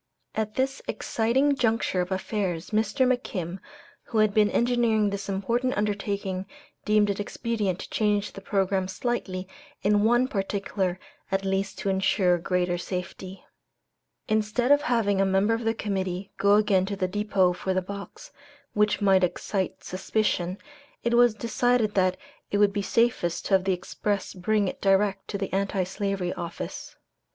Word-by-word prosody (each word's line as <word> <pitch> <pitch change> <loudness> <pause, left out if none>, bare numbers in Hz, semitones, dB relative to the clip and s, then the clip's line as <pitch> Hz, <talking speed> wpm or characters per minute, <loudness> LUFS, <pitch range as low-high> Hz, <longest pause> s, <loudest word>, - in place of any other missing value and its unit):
At 215 -1 -2
this 265 +1 -1
exciting 265 +6 +1
juncture 225 -7 +1
of 180 +1 -4
affairs, 190 -2 -2
Mr. 220 +5 +2
McKim, 195 -8 -2 0.5
who 225 - -3
had 215 -1 +4
been 210 -1 +4
engineering 235 -4 +2
this 200 0 -4
important 235 +6 0
undertaking, 200 -2 -2 0.4
deemed 210 -1 +3
it 200 - -5
expedient 205 -3 -2
to - - -8
change 210 -1 +1
the 195 - -9
programme 190 -1 0
slightly 190 -2 -3 0.4
in 205 0 +3
one 240 +3 +4
particular 195 -3 -2 0.3
at 195 0 0
least 195 0 -1
to 200 - -2
insure 190 -2 +2
greater 180 0 0
safety. 185 +1 -6 0.8
Instead 220 +4 +1
of 290 0 +6
having 225 -8 +1
a - - +5
member 195 +3 +2
of 225 0 -2
the 225 0 +1
Committee 190 -2 -3
go 200 +1 +5
again 205 -3 +3
to 200 - -2
the 185 -1 -1
depot 195 -2 +2
for 190 +1 -2
the - - +3
box, 200 +2 -9 0.4
which 210 0 +2
might 190 -2 +4
excite 190 +2 -2
suspicion, 185 -1 -1 0.5
it 235 - +1
was 240 -2 +5
decided 235 -1 +1
that 185 -1 +2 0.3
it 205 - 0
would 205 -1 +4
be 205 - -1
safest 200 -6 +1
to - - -1
have 190 -1 +4
the 190 - +2
express 200 +2 -3
bring 205 +2 +1
it - - -5
direct 195 0 +2
to 200 - -3
the 195 -1 -4
Anti 195 0 0
Slavery 195 -1 -2
Office. 170 - -6
200 Hz, 160 wpm, -26 LUFS, 190-220 Hz, 0.8 s, of